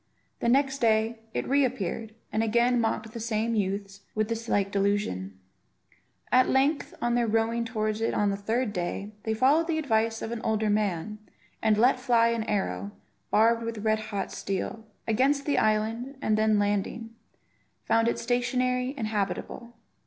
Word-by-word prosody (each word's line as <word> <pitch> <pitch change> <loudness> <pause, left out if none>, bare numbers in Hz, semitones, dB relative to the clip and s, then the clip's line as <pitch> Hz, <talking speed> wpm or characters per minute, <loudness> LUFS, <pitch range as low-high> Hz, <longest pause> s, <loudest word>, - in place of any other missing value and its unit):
The 235 - +1
next 275 +2 +2
day 225 0 +2
it - - -3
re 280 +1 +3
appeared, 225 -3 -3 0.2
and 220 - +1
again 235 +2 +2
mocked 225 -1 -1
the 235 - -5
same 225 0 -1
youths 200 -1 -2
with 215 0 0
the 230 0 -3
like 200 -1 +1
delusion. 195 - -1 0.9
At 255 0 +5
length, 280 +3 +1
on 240 0 +1
their 240 -1 +2
rowing 225 +1 +1
towards 215 -1 -2
it 225 - +1
on 205 -1 +2
the - - -1
third 220 +3 -1
day, 195 +3 -3
they 220 0 0
followed 285 +8 +3
the 325 -2 0
advice 225 -6 0
of 225 - -4
an 235 -1 -4
older 215 -1 +1
man, 210 0 -1 0.4
and 215 -1 +3
let 250 +3 +4
fly 235 -2 +3
an 230 -1 -1
arrow, 205 0 -2 0.4
barbed 230 +2 +4
with 230 -2 -5
red 220 0 +2
hot 205 -3 -4
steel, 200 +3 -4 0.2
against 270 +5 +2
the 290 - +2
island; 225 +5 0
and 220 -5 +1
then 215 0 +3
landing, 205 +3 -1 0.7
found 225 0 +3
it 235 - +1
stationary 250 +2 0
and 230 - -2
habitable. 215 +3 -3
225 Hz, 165 wpm, -27 LUFS, 210-240 Hz, 0.9 s, At